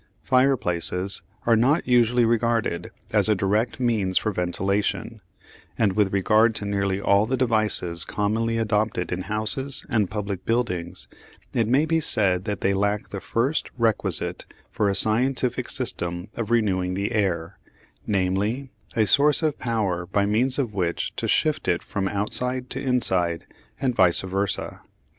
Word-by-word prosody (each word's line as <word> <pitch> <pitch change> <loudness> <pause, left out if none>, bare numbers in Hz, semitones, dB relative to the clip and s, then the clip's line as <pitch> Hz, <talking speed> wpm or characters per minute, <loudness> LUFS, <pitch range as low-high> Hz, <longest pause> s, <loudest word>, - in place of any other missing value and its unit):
Fireplaces 100 -8 +1 0.2
are 115 - +4
not 135 +9 +2
unusually 120 -1 +3
regarded 115 -6 0 0.2
as - - +3
a 105 - +4
direct 105 +6 0
means 110 -7 +1
for 105 - 0
ventilation, 100 +4 -2 0.6
and 105 -4 +2
with 100 -1 +1
regard 110 +4 +3
to 105 - -3
nearly 100 -1 -1
all 100 +1 +2
the 130 +2 -1
devices 110 -8 +1
commonly 110 +2 -1
adopted 105 -4 -1
in 90 +1 -2
houses 110 +7 0
and 105 -5 +1
public 100 -3 -4
buildings, 90 -8 -2 0.5
it 115 -2 +1
may 135 +6 +3
be 165 +1 +1
said 95 - +2
that 100 -3 -4
they 100 - +1
lack 100 +1 -1
the 100 - -6
first 130 +7 -1
requisite 115 -3 -1 0.2
for 105 - 0
a 100 - +1
scientific 125 +5 +2
system 85 +3 -2
of 115 -2 -4
renewing 95 -6 +1
the 100 +2 -2
air, 95 -4 -2 0.5
namely 105 +7 -1 0.2
a 110 -2 +3
source 145 +8 +3
of 155 -2 0
power 100 -7 -2
by 100 +2 +1
means 120 +6 +2
of 125 -7 -2
which 90 -4 -2
to - - -3
shift - - 0
it - - 0
from 95 -1 -3
outside 125 +6 -1
to 135 - -4
inside, 95 -10 +1 0.3
and 130 -2 0
vice 90 -4 +4
versâ. 95 +1 -3
105 Hz, 150 wpm, -24 LUFS, 95-120 Hz, 0.6 s, are